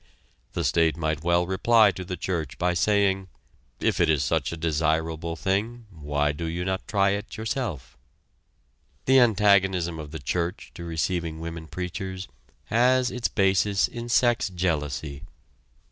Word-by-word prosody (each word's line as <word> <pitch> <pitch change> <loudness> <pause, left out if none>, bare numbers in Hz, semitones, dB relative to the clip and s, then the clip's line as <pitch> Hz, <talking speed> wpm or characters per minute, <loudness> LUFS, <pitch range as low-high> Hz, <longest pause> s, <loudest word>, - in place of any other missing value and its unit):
The - - -2
state 80 -1 +2
might 80 -1 -2
well 85 +1 +2
reply 105 +3 +4
to 95 - -7
the 90 0 -5
church 80 -7 -3
by 90 0 +1
saying: 95 0 +2 0.5
"If - - 0
it 85 - +3
is 75 -3 +2
such - - 0
a 85 - -5
desirable 80 +1 -1
thing 105 +7 -2
why 75 -3 -1
do 75 +3 -5
you 85 +2 -3
not 95 0 -2
try 100 -2 +2
it 100 +2 -4
yourself?" 90 - -4 1.1
The 130 0 +6
antagonism 95 -7 +3
of 75 -1 -7
the 80 - -6
church 85 - -3
to 85 - -8
receiving 85 0 -2
women 80 -1 -6
preachers 95 +2 -5 0.5
has 125 +2 +3
its 125 -2 -1
basis 95 0 +2
in 120 0 -7
sex 120 -3 +3
jealousy. 75 -6 -2
90 Hz, 145 wpm, -25 LUFS, 80-100 Hz, 1.1 s, The